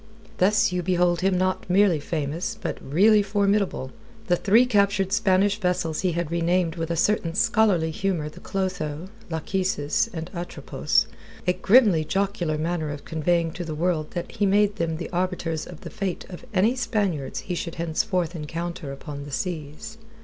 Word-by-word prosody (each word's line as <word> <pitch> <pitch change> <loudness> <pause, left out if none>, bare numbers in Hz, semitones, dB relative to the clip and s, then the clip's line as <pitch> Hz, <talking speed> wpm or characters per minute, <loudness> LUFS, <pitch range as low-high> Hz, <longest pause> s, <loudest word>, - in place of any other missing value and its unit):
Thus 205 +1 +4
you 180 0 -1
behold 175 -1 +2
him 190 0 +2
not 185 0 -1
merely 185 -3 +4
famous, 160 +7 -3
but - - -4
really 205 +9 +4
formidable. 200 -8 0 0.3
The 175 - +3
three 215 +7 +4
captured 200 -4 +2
Spanish 200 +1 +3
vessels 180 -4 0
he 180 -2 +1
had 170 -1 -2
renamed 170 0 +1
with 165 -1 -3
a 170 - 0
certain 165 -1 +1
scholarly 195 -7 +3
humour 175 -2 -1
the 150 - -10
Clotho, 180 -3 -3 0.2
Lachesis, 160 -2 0
and 165 -1 -6
Atropos, 175 -1 0 0.4
a 180 - +3
grimly 200 -6 +5
jocular 185 -2 -1
manner 160 0 -2
of 145 -1 -7
conveying 165 +1 0
to 175 - -5
the 160 -2 -5
world 160 -1 0
that 175 - -4
he 205 - +1
made 205 +1 +3
them 165 -1 -1
the 170 - -5
arbiters 175 -3 -2
of 175 - -11
the - - -8
fate 190 -3 -3
of 180 +8 -9
any 210 +5 +3
Spaniards 205 - -1
he 180 - -4
should 170 -1 -4
henceforth 170 +1 -1
encounter 165 -1 -5
upon 140 +1 -7
the 145 - -9
seas. 175 +7 -5
175 Hz, 165 wpm, -25 LUFS, 160-195 Hz, 0.4 s, grimly